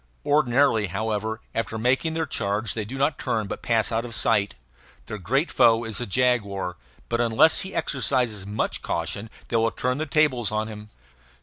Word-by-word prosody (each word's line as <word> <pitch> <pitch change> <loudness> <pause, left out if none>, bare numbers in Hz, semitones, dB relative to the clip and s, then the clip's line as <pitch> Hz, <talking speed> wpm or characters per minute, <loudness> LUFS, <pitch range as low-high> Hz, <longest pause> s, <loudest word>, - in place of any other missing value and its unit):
Ordinarily, 135 -6 +3
however, 110 +3 -2
after 115 0 -2
making 130 +8 +1
their 160 0 0
charge 105 - -1
they 110 -2 -3
do 130 +6 -7
not 140 +2 +1
turn, 110 -1 -1
but 100 - -6
pass 115 -1 +1
on 115 - +1
out 115 - -5
of 120 -1 -6
sight. 105 - +2 0.5
Their 105 - -6
great 135 - 0
foe 115 0 +4
is 115 0 -3
the 120 - -3
jaguar, 100 -5 0 0.3
but 120 0 0
unless 120 +7 +5
he 190 - -5
exercises 125 -6 0
much 105 +1 -2
caution 85 +6 -3 0.2
they 115 - +1
will 115 0 +3
turn 125 +4 -2
the 155 - -2
tables 135 -7 +2
on 110 0 -1
him. 105 0 -9
115 Hz, 185 wpm, -25 LUFS, 105-125 Hz, 0.5 s, unless